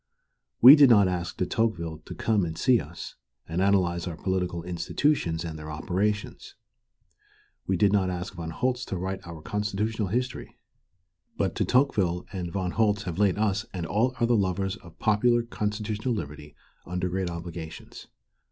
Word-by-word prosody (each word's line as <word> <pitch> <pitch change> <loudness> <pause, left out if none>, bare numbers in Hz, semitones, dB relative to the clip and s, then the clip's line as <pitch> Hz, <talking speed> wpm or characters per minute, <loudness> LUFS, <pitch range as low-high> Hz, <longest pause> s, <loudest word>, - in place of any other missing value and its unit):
We 130 +5 +12
did 145 -3 +7
not 100 -5 +6
ask 90 -1 -3
De 90 - 0
Tocqueville 85 -8 -1
to - - -8
come 110 -4 +1
and 80 -1 -4
see 125 +6 +4
us 80 +3 -9 0.3
and 85 +3 -2
analyze 90 -3 +2
our 85 -3 -5
political 90 -3 -2
institutions 85 - 0
and 80 -2 -6
their 75 0 -8
operations. 95 +7 -2 1.1
We 95 - +1
did 100 +2 +3
not 95 -2 +2
ask 90 +1 -4
Von 85 -3 -6
Holst 125 +9 -1
to 95 - -3
write 95 +2 -3
our 80 -2 -9
constitutional 105 +3 -2
history. 125 +6 -3 0.8
But - - 0
De - - 0
Tocqueville 100 -10 +2
and 90 -3 -4
Von 95 -2 -2
Holst 105 -1 +1
have 90 -1 -5
laid 100 -3 +3
us 105 -3 0
and 85 -2 -3
all 115 +9 +1
other 120 0 +3
lovers 95 -2 0
of 85 -3 -16
popular 120 +3 +2
constitutional 110 +1 -2
liberty 75 -5 -7 0.3
under 90 +1 -2
great 90 0 -2
obligations. 85 -2 -8
95 Hz, 160 wpm, -27 LUFS, 85-105 Hz, 1.1 s, We